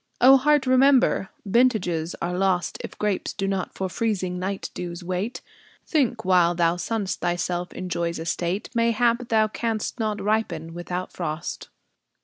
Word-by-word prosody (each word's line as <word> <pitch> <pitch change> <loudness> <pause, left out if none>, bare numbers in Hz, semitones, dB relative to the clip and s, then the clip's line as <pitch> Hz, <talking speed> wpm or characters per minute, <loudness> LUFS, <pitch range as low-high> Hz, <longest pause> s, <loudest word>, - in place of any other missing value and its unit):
O 260 +2 +8
Heart, 295 +1 +3
remember, 260 -5 +4 0.2
vintages 195 -7 +1
are 175 +1 -1
lost 185 -1 0
If - - -8
grapes 210 -3 -1
do 195 -2 -2
not 195 -2 -2
for 190 - -2
freezing 185 -3 -2
night 190 +2 -3
dews 175 0 -6
wait. 185 +6 -3 0.4
Think, 245 - 0
while 175 -2 +4
thou 170 0 +2
sunnest 205 0 -2
thyself 175 0 -1
in 185 - -6
Joy's 170 -1 -2
estate, 170 +4 -2
Mayhap 235 +1 +2
thou 220 -1 +4
canst 225 +1 -3
not 215 -2 -1
ripen 190 -6 -1
without 180 +1 -5
frost! 155 -2 -4
190 Hz, 145 wpm, -24 LUFS, 175-230 Hz, 0.4 s, O